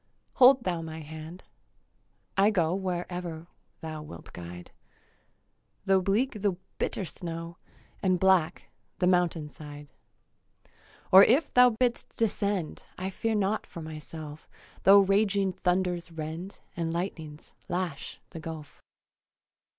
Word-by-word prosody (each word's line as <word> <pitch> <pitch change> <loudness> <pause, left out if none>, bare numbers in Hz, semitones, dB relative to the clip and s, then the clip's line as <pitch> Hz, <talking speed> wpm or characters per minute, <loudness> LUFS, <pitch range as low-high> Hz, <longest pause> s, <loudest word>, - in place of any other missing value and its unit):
Hold 255 0 +7
thou 175 -3 -1
my 160 0 -7
hand. 160 +3 -9 0.9
I 200 +2 +5
go 175 -6 +1
Wherever 175 -3 -3 0.4
thou 155 -1 -5
wilt 85 - -11
guide, 90 0 -9 1.1
Tho' 195 -1 +4
bleak 215 +4 0
the 200 -2 +2 0.3
bitter 195 - -1
snow 165 -1 -6 0.4
And 185 -2 +2
black 190 -4 +2 0.3
the 180 - +1
mountain 175 -4 +2
side. 145 -1 -11 1.2
Or 190 +1 +11
if 280 +6 +3
thou 250 0 +8
bid'st 245 -2 -1
descend, 200 -6 -1 0.2
I 185 +1 -3
fear 225 +3 -1
not 205 +1 0
for 170 - -8
myself, 155 -1 -9 0.4
Tho' 200 +2 +9
raging 195 -1 +2
thunders 180 -1 0
rend 165 +4 -6
And 165 -1 -2
lightnings 160 -3 -5 0.2
lash, 175 -5 -3
the 165 - -7
gulf. 160 -2 -8
180 Hz, 120 wpm, -28 LUFS, 160-195 Hz, 1.2 s, Or